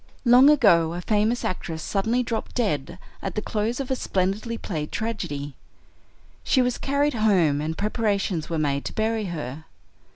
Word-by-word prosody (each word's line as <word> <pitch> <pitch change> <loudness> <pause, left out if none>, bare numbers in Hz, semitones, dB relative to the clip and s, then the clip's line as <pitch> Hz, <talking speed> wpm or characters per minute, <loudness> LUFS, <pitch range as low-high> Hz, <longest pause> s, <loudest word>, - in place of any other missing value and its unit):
"Long 250 +4 +7
ago 170 - +4
a 175 - -4
famous 215 +5 +1
actress 165 -3 -4
suddenly 225 +5 0
dropped 230 -1 -4
dead 175 - -1 0.2
at 195 - -4
the 210 - -1
close 220 +4 -2
of 270 -1 -4
a - - +2
splendidly 205 +2 -1
played 155 -9 -4
tragedy. 145 -11 -4 0.9
She 260 - +3
was 250 -1 -1
carried 280 +1 +1
home, 185 -10 +2
and 160 +1 -3
preparations 200 -6 -1
were 165 - -1
made 140 -2 0
to - - -4
bury 220 0 0
her. 155 -4 -6
205 Hz, 160 wpm, -24 LUFS, 160-230 Hz, 0.9 s, Long